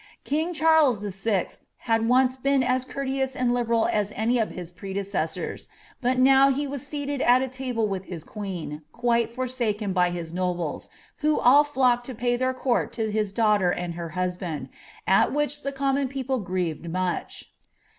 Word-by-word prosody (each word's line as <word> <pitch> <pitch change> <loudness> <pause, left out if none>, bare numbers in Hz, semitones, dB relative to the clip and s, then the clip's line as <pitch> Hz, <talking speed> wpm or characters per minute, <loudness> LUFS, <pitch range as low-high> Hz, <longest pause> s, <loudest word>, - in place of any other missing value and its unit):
King 315 +4 -1
Charles 315 - +4
V!, 200 -1 -1 0.3
had 225 0 0
once 255 +1 +4
been 270 0 +1
as 255 0 +1
conrleous 265 -1 -2
and 250 -1 +1
liberal 235 -2 +1
as 210 -1 0
any 235 +3 +1
of 220 - 0
his 175 -2 -8
pretlecessors, 190 -1 -4 0.3
hut 255 +1 +1
now 270 +1 +6
he 280 +2 0
was 280 0 -5
seated 285 -2 -3
al 250 +2 +5
a - - -1
lahle 250 -4 -2
with 190 -2 -4
his 170 -4 -7
queen, 180 -8 -6
quite 235 -1 +1
forsaken 235 -5 -2
by 180 -1 +3
his 170 -2 -5
nobles, 175 -3 -2 0.3
who 305 -1 +1
all 280 +4 +6
flocked 255 -4 +1
to 260 - -6
pay 245 +2 0
their 255 +1 +1
court 255 -2 0
to 220 -2 -2
his 210 -2 0
daughter 210 -4 +3
and 175 -1 -2
her 170 0 -5
husband, 180 -6 -3 0.4
at 190 - +4
which 295 0 -1
ihe 275 - -2
com 270 0 +1
mon 275 0 +1
people 265 -1 -2
grieved 180 -5 -2
tiiuch." 180 +1 -3
235 Hz, 175 wpm, -25 LUFS, 190-265 Hz, 0.4 s, now